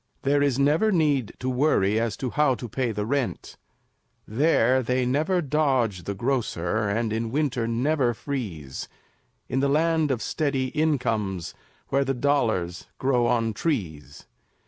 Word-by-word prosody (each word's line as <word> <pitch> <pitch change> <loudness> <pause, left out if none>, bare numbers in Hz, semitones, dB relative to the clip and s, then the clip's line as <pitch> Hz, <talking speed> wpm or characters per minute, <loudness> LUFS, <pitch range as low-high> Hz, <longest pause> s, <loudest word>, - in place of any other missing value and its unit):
There 140 +1 +2
is 140 -3 +2
never 150 +10 +3
need 145 - +1
to 130 - -5
worry 125 -6 +2
As 115 -3 -1
to 130 -3 -3
how 150 -3 +2
to 120 - -7
pay 120 +1 -1
the 105 -1 -3
rent; 135 +1 -2 0.7
There 130 0 +3
they 125 +1 0
never 155 +8 +1
dodge 130 - 0
the 100 - -3
grocer, 110 -4 -1
And 110 +1 -1
in 115 +1 -2
winter 130 -3 0
never 125 +1 +1
freeze, 100 - -5 0.6
In 130 - -1
the 140 +1 +2
Land 160 +1 +2
of 125 -4 -1
Steady 135 -4 -1
Incomes, 110 - -1 0.4
Where 140 +1 +2
the 135 0 -1
dollars 115 -11 0
grow 125 -3 +2
on 115 -2 +1
trees. 80 - -3
125 Hz, 145 wpm, -25 LUFS, 110-145 Hz, 0.7 s, never